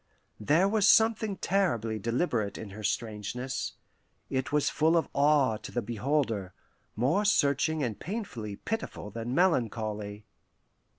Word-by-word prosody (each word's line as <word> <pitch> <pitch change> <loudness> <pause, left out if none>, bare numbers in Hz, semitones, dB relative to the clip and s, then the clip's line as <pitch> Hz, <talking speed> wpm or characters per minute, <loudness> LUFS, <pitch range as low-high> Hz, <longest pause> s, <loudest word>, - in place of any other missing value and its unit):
There 155 - +3
was 210 0 +3
something 220 -3 +4
terribly 120 - 0
deliberate 115 - -1
in 105 - -8
her 105 +2 -8
strangeness; 115 +4 -3 0.6
it 130 0 -1
was 150 -1 +2
full 160 +2 +3
of 165 - +1
awe 140 -5 +3
to - - -9
the 120 - -2
beholder, 115 -5 -1 0.4
more 135 - +2
searching 155 -5 +2
and 110 -5 -3
painfully 150 - -5
pitiful 220 - -5
than 115 +4 -4
melancholy. 110 - 0
125 Hz, 125 wpm, -29 LUFS, 110-165 Hz, 0.6 s, something